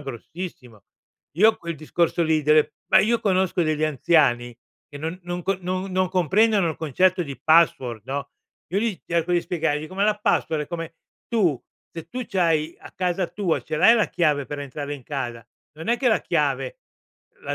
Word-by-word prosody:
grossissimo. 135 - -8 0.5
Io 220 +5 +5
quel 170 -1 -5
discorso 170 +3 0
lì 160 -2 +2
del 150 +1 +4 0.2
ma 190 - +6
io 230 +4 +2
conosco 185 -3 +1
degli 155 -1 0
anziani 135 -6 +2 0.3
che 145 - -10
non 165 +4 -4
non 175 0 -4
co 195 +1 0
non 185 +2 -3
non 185 0 +1
comprendono 190 +2 +2
il - - -7
concetto 180 +4 +1
di 140 -2 -7
password, 130 -9 +3
no, 140 +1 -4 0.4
io 190 +4 0
gli 220 -5 -1
cerco 170 +1 0
di 175 - +3
spiegargli, 155 -3 -2
com'è 195 +2 -1
la 210 0 +2
password, 160 -6 0
e - - -8
come 165 -1 -6 0.3
tu 185 - +1 0.3
se 165 - -8
tu 250 -1 -5
c'hai 165 -4 +1
a - - -12
casa 180 0 -1
tua 190 -6 -1
ce 155 - -4
l'hai 230 +9 +6
la 215 - +2
chiave 150 -5 +1
per 145 - -6
entrare 145 +1 -5
in 140 - -11
casa, 120 -5 -5 0.3
non 160 +7 -8
è 240 - +2
che 260 - +2
la 220 - +3
chiave - - -1 0.6
la - - -3
170 Hz, 185 wpm, -23 LUFS, 150-185 Hz, 0.6 s, ma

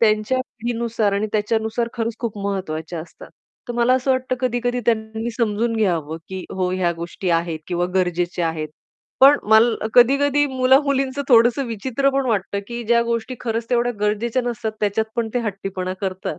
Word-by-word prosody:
त्यांच्या 215 +3 +2
पिढीनुसार 230 -3 -2
आणि 200 +2 0
त्याच्यानुसार 220 +2 0
खरंच 230 -1 -2
खूप 225 -3 -4
महत्त्वाच्या 175 -5 -3
असतात. 165 - -12 0.4
तर 240 - -2
मला 240 +2 +3
असं 260 +1 0
वाटतं 255 0 0
कधी-कधी 245 -1 0
त्यांनी 220 0 -1
समजून 230 0 0
घ्यावं, 165 -7 0
की 190 -1 -6
"हो, 185 -1 -1
ह्या 180 -2 +1
गोष्टी 170 +2 -4
आहेत 165 -1 0
किंवा 175 0 -1
गरजेच्या 175 -2 0
आहेत." 155 -1 -4 0.5
पण 280 +2 +8
माल 220 +2 +6 0.2
कधी-कधी 280 +4 +5
मुला-मुलींचं 270 +1 +2
थोडंसं 240 +2 +5
विचित्र 255 +5 0
पण 275 -1 0
वाटतं, 200 -3 -1
की 240 0 -5
ज्या 235 +1 +3
गोष्टी 235 +2 -2
खरंच 230 -1 -3
तेवढ्या 245 0 +2
गरजेच्या 220 +4 0
नसतात 230 -2 -3
त्याच्यात 210 +1 +1
पण 230 -1 0
ते - - +2
हट्टीपणा 195 -4 -4
करतात, 190 -2 -4
225 Hz, 160 wpm, -21 LUFS, 195-245 Hz, 0.5 s, पण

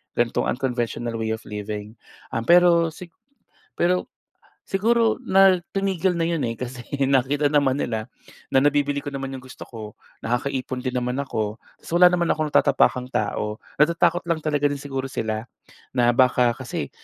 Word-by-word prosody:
gan'tong 120 -1 +1
unconventional 120 -2 -2
way 110 -1 -2
of 110 - -2
living. 105 +1 -6 0.4
Um, 115 - -1
pero 170 +1 +5
si 175 +3 -10 0.7
pero 180 +1 +1 0.6
siguro 230 +4 +1
na 190 -4 +5
tumigil 190 -2 0
na 165 - +1
'yon, 165 -2 -1
eh, 115 - -5
kasi 125 0 -6 0.3
nakita 140 +2 +2
naman 140 -3 +2
nila 110 -4 -3 0.4
na - - +2
nabibili 145 0 +2
ko 145 - -5
naman 135 -1 -4
yung 130 - -12
gusto 130 - -14
ko, 110 -3 -8 0.3
nakakaipon 130 +1 -2
din 130 -1 -2
naman 125 +1 -2
ako. 110 -5 -3 0.2
So 165 - -4
wala 180 - +9
naman 175 -1 +1
akong 155 -1 -2
natatapakang 125 -3 +3
tao. 105 0 -2 0.2
Natatakot 170 +3 +2
lang 170 -2 -1
talaga 145 -2 0
din 145 -1 -4
siguro 135 -2 -4
sila 110 -3 -3 0.5
na 120 -2 +3
baka 125 -2 +3
kasi, - - -5
135 Hz, 160 wpm, -23 LUFS, 120-170 Hz, 0.7 s, wala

